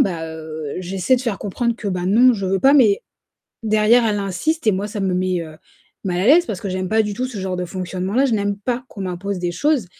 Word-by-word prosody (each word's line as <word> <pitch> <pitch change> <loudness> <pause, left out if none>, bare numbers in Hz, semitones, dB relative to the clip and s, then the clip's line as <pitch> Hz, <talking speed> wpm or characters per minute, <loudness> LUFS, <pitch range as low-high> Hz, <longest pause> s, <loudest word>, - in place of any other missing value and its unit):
Ben, 175 -4 +1
heu, 160 -2 -6
j'essaie 190 +7 +1
de - - -3
faire 235 -6 -2
comprendre 235 +4 -1
que 215 - -4
ben, 180 -2 -2
non, 240 +6 +5
je 200 -4 -3
veux 190 0 0
pas, 270 - +6
mais 225 -9 +4 0.6
derrière, 220 +2 +4
elle 210 -1 0
insiste 200 - -2
et 215 - +5
moi, 195 +2 -2
ça 210 0 -5
me 190 -2 0
met, 185 -1 0
heu, 155 -1 -10 0.5
mal 180 -2 -1
à 190 - 0
l'aise 340 +7 +6
parce 195 - -4
que 200 - -4
j'aime 185 0 -3
pas 220 +2 +3
du 210 -1 -3
tout 255 +5 -2
ce 245 -5 -7
genre 190 -1 -3
de 180 - -2
fonctionnement-là, 185 +7 -1
je 255 - -1
n'aime 205 -2 0
pas 245 +4 -3
qu'on 200 - -8
m'impose 185 +2 -4
des 175 -1 -2
choses 280 - +1
200 Hz, 250 wpm, -20 LUFS, 185-230 Hz, 0.6 s, pas